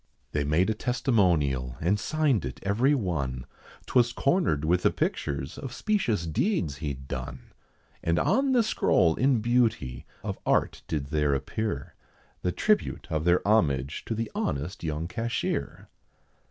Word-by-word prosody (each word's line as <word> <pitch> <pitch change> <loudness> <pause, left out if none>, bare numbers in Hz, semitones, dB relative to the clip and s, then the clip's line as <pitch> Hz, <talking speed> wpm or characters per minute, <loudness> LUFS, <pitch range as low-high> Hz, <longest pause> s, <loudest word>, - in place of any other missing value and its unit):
They 75 - 0
made 80 +6 +2
a - - +1
testimonial, 85 - +1
and 95 +6 +1
signed 150 +1 +1
it 65 -1 -5
every 120 +9 +3
one, 70 - -2 0.4
'Twas 120 -1 +3
cornered 135 - +1
with 90 +3 +2
the - - +4
pictures 70 +2 -2
of 135 - -6
specious 125 - 0
deeds 80 - 0
he'd 70 -4 -5
done; 65 -1 -6 0.5
And 85 +1 +1
on 270 - +2
the 240 -2 +4
scroll 85 - +3
in 130 -3 +2
beauty, 110 - 0 0.2
of - - -4
art - - +1
did 70 -3 -3
there 75 -2 +2
appear, 105 +11 -3 0.5
The 90 - 0
tribute 210 - +1
of 80 0 -1
their 90 +2 +3
homage 75 - +2
to 115 - -2
the 115 0 -3
honest 75 +7 -3
young 80 0 -2
cashier. 115 +4 -3
90 Hz, 145 wpm, -27 LUFS, 70-120 Hz, 0.5 s, the